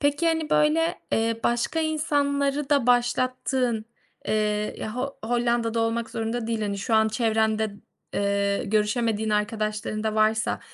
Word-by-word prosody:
Peki, 290 +3 +1
hani, 320 -2 0
böyle, 325 +3 +2
eee, 225 0 +1
başka 240 +7 +1
insanları 285 -2 0
da 280 -4 +3
başlattığın, 245 -1 +1 0.4
eee, 210 -1 0
ya, 215 - -5
Ho 275 +2 -3
Hollanda'da 235 -1 +1
olmak 230 0 -1
zorunda 225 +1 -3
değil, 225 -1 -1
hani, 200 -1 -2
şu 225 +3 -1
an 220 0 +4
çevrende, 220 -1 +1 0.5
ııı, 200 0 +1
görüşemediğin 215 +1 0
arkadaşların 215 0 -1
da 215 - 0
varsa 220 +1 +1
230 Hz, 135 wpm, -25 LUFS, 215-270 Hz, 0.5 s, an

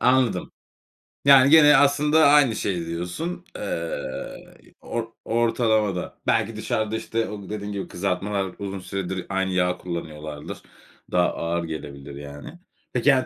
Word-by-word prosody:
Anladım. 125 -2 +2 0.7
Yani, 140 -1 +8
gene 150 -2 +8
aslında 150 +3 +4
aynı 140 -6 +5
şeyi 90 -4 -2
diyorsun. 90 - -4
Eee, 85 -8 -6
or 115 -1 -3 0.2
ortalamada. 110 -4 +1
Belki - - +1
dışarıda, 110 0 -1
işte, 115 0 -2
o 100 -2 -8
dediğin 105 -1 -4
gibi 100 -1 -4
kızartmalar 95 +1 -2
uzun 100 -1 -4
süredir 95 -1 -4
aynı 95 0 0
yağı 90 -1 +1
kullanıyorlardır. 75 -4 -6 0.5
Daha 90 0 +3
ağır 85 +1 -2
gelebilir, 70 -3 -7
yani. 70 - -9 0.3
Peki, 130 +3 +4
hani, 130 -1 +2
100 Hz, 125 wpm, -24 LUFS, 90-125 Hz, 0.7 s, Yani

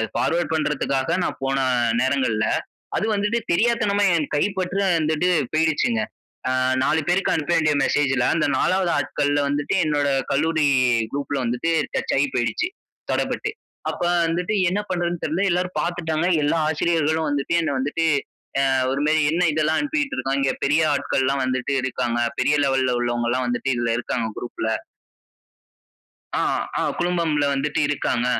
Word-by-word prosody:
Forward 170 -1 0
பண்றதுக்காக 150 0 0
நான் - - -4
போன 135 0 0 0.4
நேரங்கள்ல, 130 -5 +1 0.5
அது - - 0
வந்துட்டு 210 +3 0
தெரியாத்தனமா 205 +1 +2
என் 150 -3 -3
கைப்பற்று 190 +3 0 0.2
வந்துட்டு 155 +3 +1 0.2
போய்ருச்சுங்க. 160 +9 +1 0.5
ஆ - - +1 0.3
4 160 +1 +2
பேருக்கு 180 +2 +2
அனுப்ப 160 +1 -2
வேண்டிய 155 -2 +3
மெசேஜ்ல, 135 -3 +1
அந்த 165 - +1
4வது 185 +2 +1
ஆட்கள்ல 145 +1 0
வந்துட்டு, 145 +3 -1
என்னோட 145 -2 +1 0.2
கல்லூரி 155 +1 +2 0.5
குரூப்ல 140 0 -2
வந்துட்டு 125 +8 -1 0.2
டச்சாகிப் 135 0 0
போய்டுச்சு. 120 - 0 0.4
தடப்பட்டு.அப்ப 435 +1 -4 0.3
வந்துட்டு 175 +5 -1 0.2
என்ன 195 +3 -1
பண்றதுன்னு 175 -2 -2
தெரியல. 165 +6 0
எல்லோரும் 180 +1 -1
பார்த்துட்டாங்க. 170 -2 -1 0.2
எல்லா 150 +3 +1
ஆசிரியர்களும் 160 0 +1
வந்துட்டு, 145 +2 -1
"என்ன 155 -3 -1
வந்துட்டு, 145 +5 -1 0.7
ஆ - - +3 0.2
ஒரு 140 - -1
மாரி 155 0 +3
"என்ன 175 +1 +2
இதெல்லாம் 155 +1 +1
அனுப்பிக்கிட்டு 290 -1 -1
இருக்கான்?" 135 +1 -1
இங்க 135 - +1
பெரிய 150 +3 +3
ஆட்கள்லெல்லாம் 135 -1 0
வந்துட்டு 130 +1 -1
இருக்காங்க. 120 -2 -1 0.2
பெரிய 145 +3 +3
லெவல்ல 130 -2 +1
உள்ளவங்கெல்லாம் 120 +1 0
வந்துட்டு 120 +2 -1
இதில 120 -1 0
இருக்காங்க 120 -1 -2
குரூப்ல." 110 -2 -4 1.7
ஆ, - - +1 0.4
ஆ - - 0 0.2
குழுமம்ல 170 -4 +1
வந்துட்டு 145 +2 -1
இருக்காங்க. 125 -4 0
150 Hz, 135 wpm, -22 LUFS, 135-175 Hz, 1.7 s, வேண்டிய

